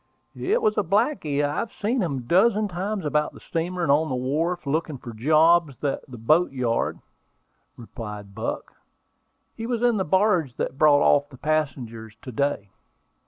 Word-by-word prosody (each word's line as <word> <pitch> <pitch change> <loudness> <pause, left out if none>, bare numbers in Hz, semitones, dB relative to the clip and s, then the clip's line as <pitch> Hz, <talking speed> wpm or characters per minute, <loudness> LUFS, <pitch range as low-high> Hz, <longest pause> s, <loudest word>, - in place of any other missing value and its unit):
"It 435 +4 0
was 215 0 +2
a - - +1
blacky 190 - +1
I 145 +1 -2
have 230 - -3
seen 230 +4 -1
a 175 - 0
dozen 205 - +3
times 195 +1 -3
about 150 0 0
the - - -13
steamer 175 +2 -3
and 145 - +2
on 155 +2 +3
the 130 - -1
wharf, 155 +7 -1
looking 155 +1 -1
for 120 -2 -9
jobs 155 +5 +3
for 140 +2 -2
that 120 -3 -11
boat 165 +7 +4
yard," 125 -4 -1 0.8
replied 105 -4 -8
Buck. 110 +2 -5 0.8
"He 225 - -5
was 240 -1 -2
in 240 -3 +3
the 190 - +1
barge 185 - +2
that 135 - -4
brought 145 -2 +5
off 145 0 +3
the 130 - -13
passengers 125 -8 -2
to 130 - -7
day." 120 -6 -1
155 Hz, 170 wpm, -24 LUFS, 130-185 Hz, 0.8 s, brought